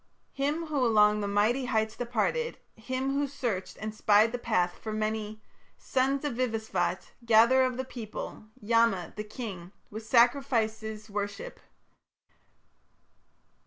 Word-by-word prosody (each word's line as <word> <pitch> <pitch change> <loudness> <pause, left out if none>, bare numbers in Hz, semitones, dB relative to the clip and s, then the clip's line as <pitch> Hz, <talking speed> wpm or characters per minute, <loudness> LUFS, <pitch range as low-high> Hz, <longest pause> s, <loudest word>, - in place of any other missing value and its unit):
Him 295 +4 -1
who 295 -4 -1
along 210 -2 +4
the 200 - -2
mighty 215 +6 +1
heights 220 -3 0
departed, 245 - -1 0.2
Him 260 +4 -3
who 285 +1 0
searched 240 -9 -4
and 215 0 -5
spied 215 +1 +4
the 245 - -3
path 180 -7 0
for 220 - -5
many, 215 0 -3 0.3
Son 265 +1 +1
of 280 -1 -2
Vivasvat, 225 -3 -1
gatherer 235 +3 +5
of 255 -1 -2
the 260 - -3
people, 225 -3 -7
Yama, 225 -5 +2
the 210 - -4
King, 210 -6 -7 0.2
with 220 +2 -7
sacrifices 225 -3 +1
worship. 205 - -5
225 Hz, 125 wpm, -29 LUFS, 215-255 Hz, 0.3 s, gatherer